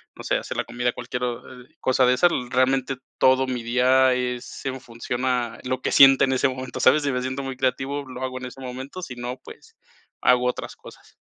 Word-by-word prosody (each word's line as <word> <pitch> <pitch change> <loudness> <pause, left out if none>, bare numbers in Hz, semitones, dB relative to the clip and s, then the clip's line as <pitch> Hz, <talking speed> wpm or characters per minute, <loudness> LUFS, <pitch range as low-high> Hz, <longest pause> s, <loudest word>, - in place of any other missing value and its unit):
No - - -10
sé, - - +1
hacer - - -4
la - - -1
comida, 125 0 -1
cualquier 125 +1 -5
o, 125 +1 -5
eh, - - -28
cosa 130 0 +2
de 125 - +4
esas, 175 +7 +4 0.2
realmente 130 +1 +1 0.2
todo 130 0 +4
mi 125 -2 -3
día 130 +2 +4
es 125 0 -4
en 130 -1 -3
función 120 +1 -5
a 125 -3 -1
lo 130 0 -2
que - - -1
sienta 135 0 +8
en 130 - 0
ese 130 +1 +2
momento, 130 -1 -6
¿sabes? 150 +3 +5
Si 140 - 0
me 125 -1 -1
siento 130 +2 -3
muy 135 -1 -5
creativo, 135 +2 -1
lo 130 -1 -9
hago 130 -1 -3
en 125 - -7
ese 125 +2 -12
momento, 130 +6 -7
si 130 -8 -7
no, 120 +1 -5
pues, - - -15 0.4
hago 125 0 +3
otras 125 - -4
cosas. - - -16
130 Hz, 225 wpm, -24 LUFS, 125-130 Hz, 0.4 s, sienta